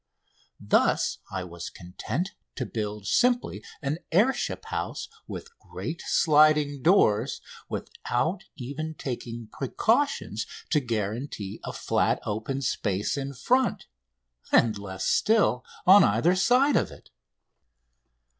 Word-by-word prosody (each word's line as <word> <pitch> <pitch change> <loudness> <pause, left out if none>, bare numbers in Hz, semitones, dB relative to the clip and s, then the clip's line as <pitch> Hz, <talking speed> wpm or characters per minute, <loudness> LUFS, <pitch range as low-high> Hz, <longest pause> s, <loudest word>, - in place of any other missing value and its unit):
Thus - - +2
I 95 -1 -3
was 85 -1 -7
content 100 - -4 0.2
to 130 - -3
build 105 -3 -4
simply 245 - +2 0.2
an 145 +4 -1
air 215 +11 +4
ship - - -4
house - - -4 0.2
with 465 0 -8
great 165 +1 -6
sliding 150 -2 +4
doors 125 - +3 0.3
without 160 +11 -2
even 155 +4 -5
taking 120 -4 -6
precautions 240 - 0 0.2
to 150 - +4
guarantee 110 -2 -3
a - - -4
flat, - - +1
open 115 +6 -3
space 100 -5 -1
in 140 -1 -4
front, 255 - +1 0.7
and, 110 -2 +4
less 95 -2 -5
still, 210 - +3 0.2
on 195 +3 +9
either 115 - +3
side 250 +8 +4
of - - +1
it. - - -15
140 Hz, 115 wpm, -27 LUFS, -, 0.7 s, on